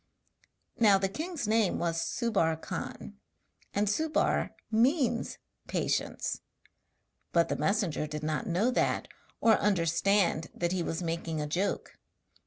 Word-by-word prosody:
Now 210 -4 +6
the 195 0 +1
king's 310 - -4
name 220 -2 +2
was 165 -1 0
Subbar 165 -4 0
Khan, 65 - -6 0.5
and 205 +1 +1
Subbar 310 +9 +1 0.2
means 240 +1 +2 0.3
'patience'; - - -1 0.9
but 170 -1 +3
the - - 0
messenger 195 -7 0
did 150 0 -5
not 155 +9 -1
know 200 +8 +2
that, - - +1 0.3
or 225 -1 +6
understand 180 -2 +2
that 175 0 -1
he 185 -1 0
was 165 +1 -2
making 165 -1 -2
a 150 - -1
joke. 175 +7 -2
195 Hz, 125 wpm, -30 LUFS, 165-225 Hz, 0.9 s, Now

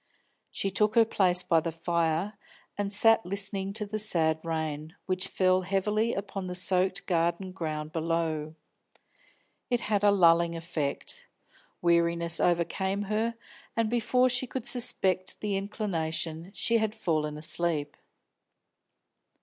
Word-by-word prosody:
She 195 - -2
took 210 +2 +2
her 230 -1 +6
place 180 -4 +4
by 165 - +3
the 165 +1 -3
fire, 170 +3 -1 0.4
and 205 -1 -2
sat 225 +2 +4
listening 195 0 -2
to 210 0 -3
the 215 +1 -4
sad 160 -6 +1
rain, 160 -1 -4
which 185 0 -1
fell 185 0 +2
heavily 210 +5 0
upon 195 -1 -5
the 180 - -5
soaked 185 +1 +1
garden 170 +1 0
ground 155 -4 -4
below. 160 -1 -2 1.1
It 245 -1 +1
had 205 -2 0
a 205 - +6
lulling 170 -3 +4
effect. 165 -4 -4 0.6
Weariness 170 -1 +2
overcame 190 +3 0
her, 220 +3 -1 0.4
and 225 -1 +1
before 250 +2 +2
she 250 +1 +1
could 255 -1 -5
suspect 235 -8 +1
the 205 -2 -2
inclination, 170 -5 -3
she 230 0 +2
had 220 0 -1
fallen 150 -3 -1
asleep. 155 -1 -1
185 Hz, 130 wpm, -28 LUFS, 165-205 Hz, 1.1 s, her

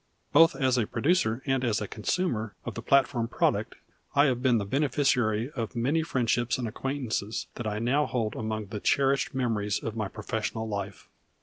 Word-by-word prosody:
Both 165 +3 +7
as 130 -3 +2
a 110 - 0
producer 130 -3 +1
and 135 -2 +1
as 115 -4 +1
a 105 - -4
consumer 110 - -2
of - - -4
the 115 - -6
platform 130 -1 +2
product - - 0 0.4
I 145 +1 +6
have 125 -3 +1
been 125 -2 +4
the 100 - -1
beneficiary 130 -2 +1
of 115 -6 -4
many 135 +8 +1
friendships 120 -5 0
and 125 -2 -2
acquaintances 120 -3 -3
that 120 - -5
I 105 0 -2
now 130 +7 +1
hold 115 -4 -2
among 110 -2 -3
the 105 -1 -4
cherished 135 +3 +1
memories 110 -5 0
of 115 - -5
my 105 -3 -2
professional 110 +2 -3
life. 100 -2 -5
120 Hz, 180 wpm, -28 LUFS, 110-135 Hz, 0.4 s, Both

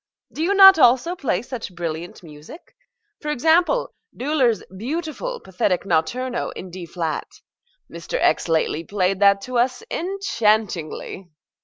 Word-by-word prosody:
Do - - -5
you 380 +5 +1
not 385 -3 +9
also 260 +7 +4
play 235 - -1
such 235 -7 -7
brilliant 170 +1 -6
music? 155 - -13 0.4
for 300 - -5
example, 325 - +2 0.2
Döhler's 260 -4 +1
beautiful, 320 - -4
pathetic 185 0 -1
Notturno 240 +8 -1
in 185 - -8
D 180 -1 -8
flat. 165 -2 -3 0.6
Mr. - - -5
X. - - +2
lately 165 0 0
played 190 0 -1
that 200 -1 +4
to 250 +1 -2
us 250 +1 0
enchantingly. 215 - -1
230 Hz, 130 wpm, -22 LUFS, -, 0.6 s, not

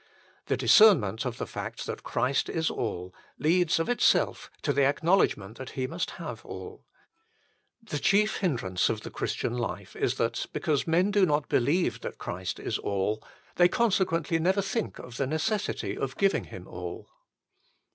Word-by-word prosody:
The - - +1
discernment 135 - +5
of 125 -2 -3
the - - -3
fact - - -6
that - - -5
Christ 135 +1 0
is 160 0 0
all 90 -5 -4 0.2
leads 175 +1 +3
of 165 - 0
itself 245 - +2
to 145 - +1
the 140 +1 +3
acknowledgment 140 - +2
that 130 - -6
He 130 - 0
must 165 +6 -3
have - - -7
all. - - -9 1.0
The 155 -10 -4
chief 210 +7 +3
hindrance 115 - 0
of 110 -1 -2
the - - -8
Christian - - -2
life 120 -2 -4
is - - 0
that, - - -1
because 150 -1 0
men 180 +5 +3
do 205 -1 +3
not 150 -1 +1
believe 155 +9 +1
that - - -6
Christ 90 0 -4
is - - -2
all, 100 +2 -1 0.3
they 175 - +7
consequently 180 -7 +1
never 190 +4 +2
think 205 +3 -2
of 125 -1 -9
the 135 - 0
necessity 200 +8 -1
of 135 -1 -4
giving 195 0 +2
Him 90 -1 -10
all. 90 0 -7
150 Hz, 165 wpm, -28 LUFS, 115-185 Hz, 1.0 s, they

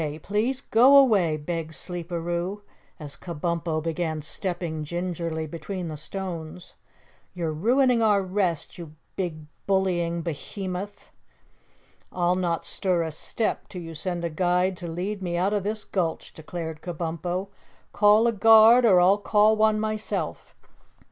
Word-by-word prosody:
Please 230 +6 -1
go 260 +5 +6
away!" 200 - +4
begged 160 +1 -4
Sleeperoo, 175 +2 -4 0.4
as 145 -3 -7
Kabumpo 170 -1 -3
began 160 -2 -2
stepping 170 -2 -3
gingerly 170 -1 -3
between 170 +3 -6
the 155 - -5
stones. 170 +1 -7 0.6
"You're 165 -3 -2
ruining 245 - +3
our 205 -3 +3
rest, 185 -3 -2
you 160 -3 -9 0.2
big 160 -5 -4 0.2
bullying 175 -3 0
Behemoth!" 185 +5 -6 1.0
"I'll 175 0 +1
not 175 -3 -1
stir 180 -3 0
a 160 - -4
step 215 +8 -3
till 180 -3 -8
you 165 0 -8
send 170 +2 -3
a 170 - -3
guide 180 +3 +1
to 175 - -6
lead 185 +5 -4
me 175 -2 -2
out 190 +4 +1
of 205 - +1
this 210 +2 -3
gulch," 170 -4 -3
declared 160 -1 -7
Kabumpo. 175 +2 -4 0.4
"Call 210 +2 +5
a 235 - +4
guard 225 +3 +7
or 190 -5 +6
I'll 190 +3 +5
call 210 +1 +4
one 215 0 +3
myself." 215 0 -3
180 Hz, 135 wpm, -25 LUFS, 165-205 Hz, 1.0 s, guard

